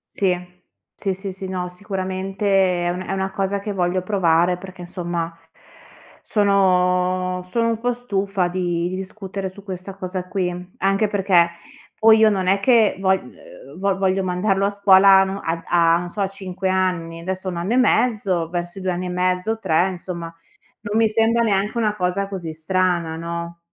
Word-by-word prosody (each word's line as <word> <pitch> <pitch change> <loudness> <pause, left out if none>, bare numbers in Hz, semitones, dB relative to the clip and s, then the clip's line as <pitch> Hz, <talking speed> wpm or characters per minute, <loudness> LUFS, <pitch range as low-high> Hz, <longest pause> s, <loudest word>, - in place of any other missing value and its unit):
Sì. 180 -2 -2 0.3
Sì, 195 -2 -2
sì, 195 +1 -6
sì, 190 0 -7
no, 180 -1 -3
sicuramente 190 -1 -1
è - - +1
un 180 +1 -4
è 185 - -5
una 190 0 -2
cosa 195 +1 -1
che 205 +1 -4
voglio 180 0 0
provare 180 -3 +2
perché, 185 -1 -10
insomma, 175 -1 -4 0.9
sono 185 -2 +2
sono 230 +6 0
un 225 -1 -1
po' 245 +1 0
stufa 195 -6 -1
di 175 -1 -1
di 185 - -4
discutere 190 0 -5
su 195 +2 -14
questa 190 0 -7
cosa 185 -1 -5
qui, 180 -1 -3
anche 195 +2 +2
perché 190 -4 +3 0.5
poi 220 0 +6
io 220 0 +6
non 195 -3 0
è 195 +2 +3
che 225 -1 +4
vo 190 -1 0
uhm, - - -4
vo 195 0 +1
voglio 190 0 +1
mandarlo 195 +2 +1
a - - +2
scuola 195 -1 +6
a - - +5
no 195 +1 -3
a 165 0 -2 0.3
a - - +3
non 175 0 -5
so, 200 +3 -5
a 195 - +2
5 190 -1 -4
anni, 180 -3 -1
adesso 185 +1 -4
ha - - -1
1 175 - -5
anno 180 +7 -1
e - - +2
mezzo, 210 -9 +2
verso 175 +1 -4
i - - -6
2 185 - 0
anni 180 +1 -3
e - - -4
mezzo, 180 +4 0
3, 185 -3 +2
insomma, 175 -2 -6 0.5
non 210 +1 -2
mi 225 - +4
sembra 225 +2 +2
neanche 210 0 0
una 215 -2 +1
cosa 185 +1 -1
così 185 -5 -5
strana, 170 0 0
no? 170 +1 -5
190 Hz, 185 wpm, -21 LUFS, 180-200 Hz, 0.9 s, poi